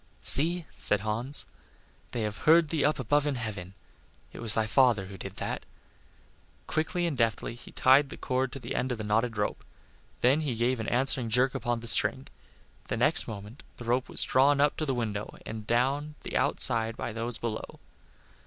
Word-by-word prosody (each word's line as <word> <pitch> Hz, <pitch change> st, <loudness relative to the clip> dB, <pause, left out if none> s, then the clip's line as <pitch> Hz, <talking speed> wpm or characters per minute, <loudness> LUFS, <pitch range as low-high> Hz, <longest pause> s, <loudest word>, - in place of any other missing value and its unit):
"See," 165 Hz, +4 st, +9 dB
said 105 Hz, -, +5 dB
Hans, 115 Hz, +7 st, -3 dB, 0.6 s
"they 120 Hz, -, -5 dB
have 105 Hz, 0 st, -5 dB
heard 165 Hz, -1 st, +5 dB
thee 160 Hz, -3 st, -1 dB
up 150 Hz, -, +1 dB
above 145 Hz, +4 st, 0 dB
in 145 Hz, -, -2 dB
heaven; 100 Hz, -6 st, -7 dB, 0.6 s
it -, -, -10 dB
was 115 Hz, -2 st, +3 dB
thy 110 Hz, -, 0 dB
father 115 Hz, -3 st, +2 dB
who 95 Hz, +1 st, -11 dB
did -, -, -8 dB
that." -, -, -5 dB, 1.0 s
Quickly 175 Hz, +3 st, -2 dB
and 165 Hz, -4 st, -2 dB
deftly 115 Hz, -2 st, -1 dB
he 120 Hz, -, -14 dB
tied 135 Hz, +2 st, +3 dB
the -, -, -10 dB
cord 130 Hz, 0 st, -2 dB
to 135 Hz, -, -7 dB
the -, -, -7 dB
end 130 Hz, +1 st, -2 dB
of 125 Hz, -, -3 dB
the 110 Hz, -, -6 dB
knotted 110 Hz, +2 st, -1 dB
rope; 105 Hz, -, -3 dB, 0.6 s
then 135 Hz, +5 st, +2 dB
he 140 Hz, -6 st, -3 dB
gave 120 Hz, +2 st, -1 dB
an 110 Hz, -, -5 dB
answering 125 Hz, -1 st, +1 dB
jerk 125 Hz, +3 st, +1 dB
upon 120 Hz, -3 st, -3 dB
the 115 Hz, -, -8 dB
string. 115 Hz, -, +2 dB, 0.6 s
The -, -, -3 dB
next -, -, +1 dB
moment 105 Hz, +3 st, -9 dB, 0.2 s
the 120 Hz, -, -10 dB
rope 125 Hz, +2 st, -1 dB
was -, -, +3 dB
drawn 140 Hz, +2 st, +2 dB
up 145 Hz, 0 st, +2 dB
to 155 Hz, -, -3 dB
the 135 Hz, -, -1 dB
window 105 Hz, -3 st, -5 dB
and 110 Hz, -1 st, -8 dB
down 140 Hz, +5 st, -1 dB
the -, -, -8 dB
outside 115 Hz, -2 st, +1 dB
by 115 Hz, -, -5 dB
those 115 Hz, +1 st, -3 dB
below. 115 Hz, -2 st, -6 dB
120 Hz, 190 wpm, -27 LUFS, 110-135 Hz, 1.0 s, See